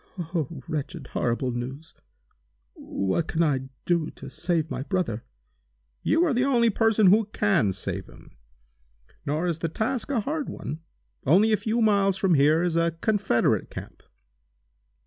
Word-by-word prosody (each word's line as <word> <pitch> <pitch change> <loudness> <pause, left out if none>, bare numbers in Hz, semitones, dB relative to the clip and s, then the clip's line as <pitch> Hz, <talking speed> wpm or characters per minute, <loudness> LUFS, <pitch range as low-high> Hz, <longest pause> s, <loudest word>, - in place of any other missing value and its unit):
"Oh 165 -4 -2 0.2
wretched, 150 -2 -4
horrible 125 +2 0
news! 130 +6 -6 0.8
What 100 - -2
can 165 +1 +1
I 135 -4 0 0.2
do 170 -3 +1
to - - -11
save 165 -3 -1
my - - -3
brother?" 140 - -2 0.8
"You 330 +3 +3
are 310 - +1
the 245 +1 +2
only 240 -4 +3
person 220 0 +3
who 215 +2 +4
can 195 - +1
save 95 0 -5
him. - - -16 1.0
Nor 155 +4 0
is 170 -2 -1
the 165 - -1
task 225 - -2
a 260 -5 +1
hard 295 +6 -3
one. 155 - -6 0.4
Only 200 +10 +4
a - - +5
few 220 +3 0
miles 200 -3 +3
from 190 -2 +2
here 155 +3 +4
is 175 -2 0
a 165 0 +1
Confederate 205 - +1
camp. - - -9
175 Hz, 150 wpm, -26 LUFS, 150-215 Hz, 1.0 s, a